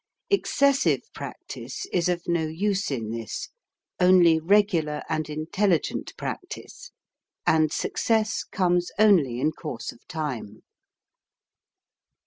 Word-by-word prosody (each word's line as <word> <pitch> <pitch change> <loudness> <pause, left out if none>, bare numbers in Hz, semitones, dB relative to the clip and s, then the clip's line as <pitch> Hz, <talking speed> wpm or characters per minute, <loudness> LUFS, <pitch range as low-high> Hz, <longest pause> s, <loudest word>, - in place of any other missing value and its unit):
Excessive 280 -8 +3
practice - - -7
is 180 -1 +2
of 175 -1 -1
no 170 -2 +1
use 195 +5 -1
in 115 -6 -3
this 115 -1 -5 0.5
only 180 -3 +6
regular 170 -5 +2
and 155 -1 -1
intelli 160 +3 +1
gent - - -5
practice; - - -7 0.6
and 155 -1 +3
success 220 +4 0
comes 175 -1 +1
only 175 - +4
in 150 +4 +2
course 125 -8 -6
of - - -18
time. 140 - -5
170 Hz, 110 wpm, -25 LUFS, 150-195 Hz, 0.6 s, only